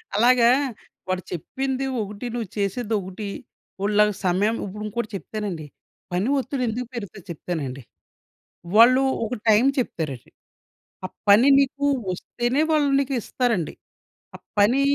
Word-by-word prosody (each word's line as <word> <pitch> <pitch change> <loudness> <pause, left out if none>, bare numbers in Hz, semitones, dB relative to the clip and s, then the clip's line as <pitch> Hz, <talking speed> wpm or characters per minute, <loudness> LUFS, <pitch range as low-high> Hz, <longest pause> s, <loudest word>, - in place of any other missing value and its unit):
అలాగా 235 +1 +5 0.6
వాడు 185 -1 -1
చెప్పింది 265 - -3 0.2
ఒకటి, 205 +3 -6
నువ్వు 230 -5 -3
చేసేదొకటి. 200 -1 -2 0.5
వోడి 205 +2 0
లాగ 210 0 +5
సమయం 195 +5 +2
ఇప్పుడింకోటి 210 +3 -4
చెప్తానండి, 195 -6 -5 0.5
పని 180 +5 0
ఒత్తిడెందుకు 250 -2 -2
పెరుగుతది 205 -5 -7
చెప్తానండి. 145 -5 -4 0.9
వాళ్ళు 255 +4 +7 0.2
ఒక 235 +3 -3
టైం 220 +4 +5
చెప్తారండి, 155 - -3 0.7
ఆ - - -2 0.2
పని 225 +7 +7
నీకు 280 +1 +1 0.3
వస్తేనే 240 - -1
వాళ్ళు 295 -3 +3
నీకిస్తారండి. 245 - -1 0.6
ఆ - - -7 0.2
పనీ 240 +7 +4
215 Hz, 110 wpm, -24 LUFS, 190-250 Hz, 0.9 s, వాళ్ళు